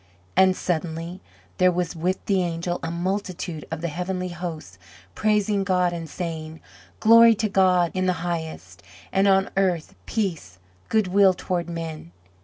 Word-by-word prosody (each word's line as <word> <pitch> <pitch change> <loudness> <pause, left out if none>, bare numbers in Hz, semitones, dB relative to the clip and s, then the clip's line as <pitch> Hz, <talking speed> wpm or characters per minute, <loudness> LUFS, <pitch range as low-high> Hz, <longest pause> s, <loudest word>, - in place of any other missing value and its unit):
And 190 0 +5
suddenly 170 +1 -3 0.4
there 185 0 +5
was 175 -1 -2
with 180 +3 -2
the 195 -2 +2
angel 175 0 -2
a 165 - -3
multitude 180 -2 -3
of 160 -1 -5
the 170 - -1
heavenly 180 +3 -3
host 165 - -7 0.3
praising 210 -1 +1
God 180 -2 +1
and 165 -2 -6
saying: 160 -2 -5 0.4
Glory 230 +1 +7
to 215 +1 0
God 185 -3 +3
in 185 0 0
the 180 - +3
highest, 165 -2 -5 0.3
And 195 +1 +3
on 195 0 +3
earth 185 -5 0
peace, 170 - -3 0.3
Good 215 -4 +2
will 195 0 +5
toward 175 -2 -3
men. 160 - -6
180 Hz, 150 wpm, -24 LUFS, 165-190 Hz, 0.4 s, Glory